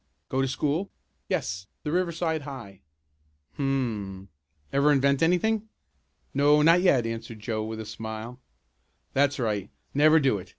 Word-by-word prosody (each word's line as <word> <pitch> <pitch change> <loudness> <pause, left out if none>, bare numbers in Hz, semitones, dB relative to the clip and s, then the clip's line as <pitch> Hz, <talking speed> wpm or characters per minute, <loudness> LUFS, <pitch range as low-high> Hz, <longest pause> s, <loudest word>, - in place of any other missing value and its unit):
Go 130 - +1
to 135 - +1
school?" 145 +8 -1 0.4
"Yes, 95 +1 -2 0.2
the 150 - -2
Riverside 170 -2 0
High." 130 -9 -9 0.8
"Hum! 110 -9 -2 0.4
Ever 140 +2 +4
invent 140 -1 +3
anything?" 210 +6 +2 0.6
"No, 145 +1 +5
not 165 +3 +6
yet," 135 -10 +4
answered 115 -1 -5
Joe 110 0 -2
with 110 0 -5
a 110 - -5
smile. 110 +3 -7 0.7
"That's 140 +1 +2
right 105 -6 -1 0.2
never 155 +3 +6
do 130 -8 +2
it. 90 - -11
135 Hz, 135 wpm, -27 LUFS, 110-150 Hz, 0.8 s, not